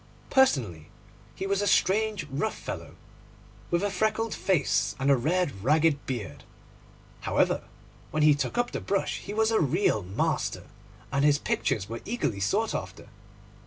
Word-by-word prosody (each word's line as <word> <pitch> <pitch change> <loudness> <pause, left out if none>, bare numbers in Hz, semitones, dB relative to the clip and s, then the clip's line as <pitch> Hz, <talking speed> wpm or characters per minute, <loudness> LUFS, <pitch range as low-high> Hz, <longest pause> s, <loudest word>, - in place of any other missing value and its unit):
Personally 120 - +2 0.5
he 190 - -4
was 200 0 0
a 205 - 0
strange 210 +1 +2
rough 215 +11 -2
fellow, - - -7 0.7
with 170 +2 +1
a 205 - 0
freckled 220 +3 0
face 180 -8 +1
and 135 +1 +2
a - - +6
red 145 - -1
ragged 150 +2 +3
beard. 105 - -5 0.8
However, - - +1 0.4
when 155 0 0
he 150 -1 +7
took 145 +10 -2
up 245 0 +1
the - - -4
brush 200 -1 -1
he - - -8
was 220 +1 +2
a 220 - +3
real 155 - +2
master, 95 +2 -1 0.5
and 140 0 +1
his 145 -1 +5
pictures 115 -7 -1
were 115 +1 -6
eagerly 220 - -2
sought 100 +1 0
after. - - -6
155 Hz, 155 wpm, -27 LUFS, 130-205 Hz, 0.8 s, he